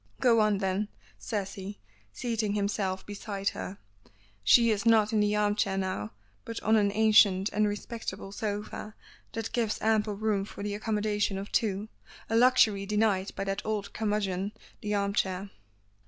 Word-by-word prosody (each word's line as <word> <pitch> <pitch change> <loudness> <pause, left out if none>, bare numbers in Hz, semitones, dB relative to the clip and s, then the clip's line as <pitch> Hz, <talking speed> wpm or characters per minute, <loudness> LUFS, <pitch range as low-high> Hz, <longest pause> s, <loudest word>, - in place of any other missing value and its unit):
"Go 235 -3 +4
on 215 -2 +3
then," 195 +1 -1 0.3
says 195 - -3
he, 200 +1 -7 0.3
seating 220 - -2
himself 200 -2 -1
beside 200 -1 -3
her. 195 - -6 0.7
She 230 - +6
is 205 -2 0
not 225 -1 +4
in 215 - +3
the 210 0 +2
arm 210 0 +2
chair 195 -2 0
now, 185 - -3 0.3
but 230 - -5
on 220 +1 +4
an 205 -2 +3
ancient 205 -2 +5
and 210 0 +3
respectable 205 -2 -5
sofa 210 +1 -4 0.4
that 225 -1 -4
gives 225 -3 0
ample 215 -1 +1
room 210 -1 0
for 200 - -8
the 205 0 -2
accommodation 210 -2 0
of 195 +1 -6
two; 210 -1 0 0.4
a - - +2
luxury 225 -5 +4
denied 210 -2 +1
by - - -2
that 195 +1 -3
old 215 -2 -3
curmudgeon 205 -2 -1 0.3
the 210 0 -1
arm 200 0 0
chair. 190 0 -1
205 Hz, 160 wpm, -29 LUFS, 195-215 Hz, 0.7 s, She